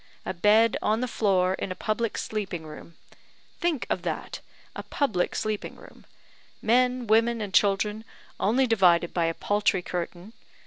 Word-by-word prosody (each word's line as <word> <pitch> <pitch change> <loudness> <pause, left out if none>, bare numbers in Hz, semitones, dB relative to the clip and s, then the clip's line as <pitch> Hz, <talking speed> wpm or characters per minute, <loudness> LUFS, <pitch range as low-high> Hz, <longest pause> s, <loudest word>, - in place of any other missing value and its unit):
A - - -3
bed 210 +5 +4
on 215 +1 +1
the 255 - -1
floor 190 -5 +1
in 190 - -4
a - - -4
public 220 +2 -2
sleeping 195 -6 -4
room! 155 +2 -11 0.6
Think 335 -7 0
of - - -1
that; - - -4 0.4
a - - -4
public 220 -12 -1
sleeping 215 -1 -3
room! - - -16 0.5
men, 250 +2 +2
women, 230 +2 +3
and 205 -3 -5
children, 210 +2 +2 0.4
only 245 +7 +2
divided 180 -7 +3
by 170 -2 +1
a 165 0 -1
paltry 205 -3 0
curtain. 180 +4 -5
210 Hz, 150 wpm, -26 LUFS, 185-230 Hz, 0.6 s, bed